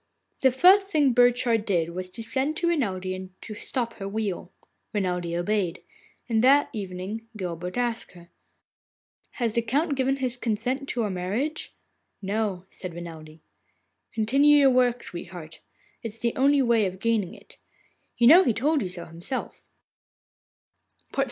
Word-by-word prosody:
The 265 - +5
first 370 +10 +5
thing 295 -9 +2
Burchard 245 -2 +3
did 175 -6 0
was 185 +2 -5
to 205 +5 -8
send 265 +7 -1
to 345 - 0
Renelde 190 - -1
and 185 0 -10
to 215 - -7
stop 235 +2 -3
her 195 0 -4
wheel. 200 -4 -3 0.4
Renelde 180 -3 -1
obeyed, 180 -1 -1 0.4
and 225 -2 +1
that 280 +3 +5
evening 200 +2 -5
Guilbert 180 0 -5
asked 240 -2 -2
her: 175 0 -16 1.0
'Has 235 -4 -1
the 235 - +2
Count 285 +8 0
given 270 0 +1
his 255 -2 -2
consent 250 +4 -2
to 240 - -1
our 210 - -1
marriage?' 210 - -3 0.4
'No,' 200 -2 -2
said 180 -3 -7
Renelde. 160 -2 -9 0.7
'Continue 275 +7 +4
your 275 -2 +6
work, 250 -1 +2
sweetheart. 175 -2 -8 0.4
It - - -4
is 220 0 -10
the 235 +1 -1
only 275 +1 +4
way 230 -4 +3
of 185 0 -6
gaining 215 -3 0
it. - - -18 0.6
You 240 - +3
know 335 +9 +9
he 240 - +2
told 290 +7 +1
you 190 - -3
so 175 -1 -7
himself. 170 +10 -6
225 Hz, 150 wpm, -26 LUFS, 185-260 Hz, 1.0 s, know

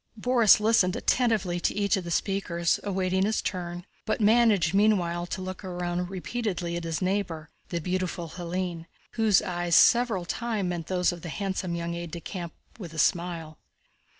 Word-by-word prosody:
Borís 235 -3 +5
listened 210 -4 +3
attentively 210 -8 +1
to - - 0
each 200 -1 +2
of 190 - -3
the 170 - -6
speakers, 170 -2 0
awaiting 190 -1 0
his 220 +2 +1
turn, 175 -1 -4 0.2
but 215 - -1
managed 215 -5 +4
meanwhile 180 -4 +2
to 185 +1 -4
look 185 0 -6
round 180 -1 -3
repeatedly 185 -3 -3
at 170 -1 -4
his 165 +2 -2
neighbor, 185 -5 -2 0.2
the 170 - -2
beautiful 180 -1 -3
Hélène, 175 -1 -4 0.2
whose 220 -4 +3
eyes 175 -2 0
several 235 -7 +5
times 220 -2 -2
met 170 -3 -4
those 180 -1 +1
of 175 -1 -8
the 170 - -6
handsome 190 -1 -3
young 170 0 -3
aide 170 0 -5
de 170 - -6
camp 170 -1 -6 0.3
with 170 -5 -8
a - - -8
smile. 165 -1 0
180 Hz, 170 wpm, -27 LUFS, 170-200 Hz, 0.3 s, Borís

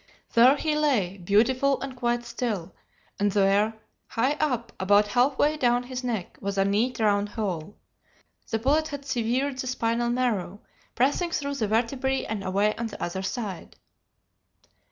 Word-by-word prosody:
There 245 +4 +7
he 305 +1 -1
lay, 225 -12 +1
beautiful 245 +9 +2
and 270 -1 -6
quite 240 -1 -1
still; 205 -10 -3 0.5
and 205 0 +2
there, 205 +2 +2 0.3
high 255 +5 +1
up, 250 -6 -1
about 205 +2 +4
half 255 +4 +2
way 305 +1 +2
down 245 -3 +2
his 255 0 -6
neck, 225 -7 -4
was 200 0 -3
a 195 - +3
neat 220 +6 0
round 205 -1 +2
hole. 200 -4 -4 0.7
The 225 - 0
bullet 290 +7 +2
had 285 -2 -7
severed 255 +2 -1
the 255 - -3
spinal 235 -1 0
marrow, 225 -6 -1 0.4
passing 285 +8 +1
through 285 -4 -2
the 230 -6 -1
vertebræ 255 +5 0
and 210 -2 -3
away 200 +3 +1
on 235 - -2
the 220 - -9
other 180 +2 -3
side. 195 -2 -5
235 Hz, 155 wpm, -26 LUFS, 205-260 Hz, 0.7 s, There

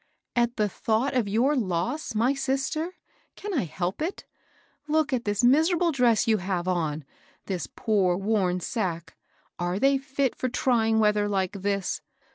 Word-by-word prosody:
" - - -62
At 240 0 +2
the 210 - +2
thought 225 +7 0
of 245 -5 +1
your 240 +9 +2
loss, 220 - -2
my 235 +5 +3
sister, 275 +6 -2 0.4
can 415 0 -5
X 245 - -1
help 185 +7 -2
it? 340 +5 -3 0.6
Look 305 -1 +1
at 245 -2 -1
this 205 +2 0
mis^iiable 320 +6 +4
dress 240 -5 +3
you 220 -1 +4
have 185 -2 -2
on, 155 -5 -1 0.2
— - - -33
this 180 -8 -3
poor 190 - +1
worn 195 -3 0
sack, 170 -4 -3
^ - - -39
are 175 +1 -1
they 275 +4 +3
fit 275 -1 -1
for 255 - -2
trying 225 -3 +2
weather 210 -1 +3
like 190 -2 0
this? 200 -1 -1
220 Hz, 170 wpm, -26 LUFS, 190-270 Hz, 0.6 s, mis^iiable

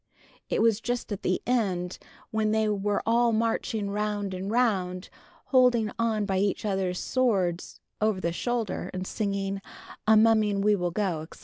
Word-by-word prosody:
It - - +1
was 225 -1 +3
just 245 -1 -3
at 200 - -3
the 185 - -1
end, 185 -8 0 0.3
when 220 -1 +1
they 220 0 +2
were 205 0 0
all 235 +1 +3
marching 220 -2 -1
round 205 -1 -2
and 185 +2 -4
round, 195 -6 0 0.3
holding 250 -5 +3
on 220 -2 +1
by 190 -2 0
each 200 +2 0
other's 190 -3 -1
swords 195 -10 0 0.2
"over 215 -3 +2
the 170 -2 -1
shoulder," 240 +2 -2
and 185 0 -3
singing 195 -1 -2 0.5
"A 220 0 +7
mumming 215 -2 +4
we 210 +1 +4
will 180 -2 -1
go, 180 -3 -1
etc. 160 - -12
210 Hz, 165 wpm, -27 LUFS, 190-225 Hz, 0.5 s, A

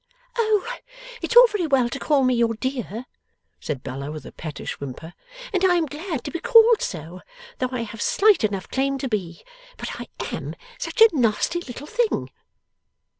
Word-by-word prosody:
'Oh, 435 -2 +2 0.5
it's 475 - -2
all - - +11
very 415 -8 -1
well 265 -4 +3
to 275 +3 -5
call 285 -2 +2
me 255 0 +3
your 235 -1 +2
dear,' 245 -1 -4 0.5
said 130 -3 -4
Bella, 140 +2 -5
with 155 0 -8
a - - -9
pettish 155 -3 -6
whimper, 140 +5 -7 0.4
'and 375 -1 +1
I 365 -2 +5
am 340 -2 +2
glad 305 0 -5
to - - -5
be 340 - -3
called 460 +1 +6
so, 170 +1 -5 0.4
though 255 - 0
I 250 -2 -2
have 225 -1 -8
slight 415 - +4
enough 200 -3 -1
claim 275 +1 0
to 270 - -3
be. 185 -8 -3 0.3
But - - -6
I - - -7 0.3
AM - - -5 0.2
such - - -3
a 450 - +10
nasty 225 +5 +1
little 260 -1 -8
thing! 475 +7 -1
260 Hz, 180 wpm, -23 LUFS, -, 0.5 s, all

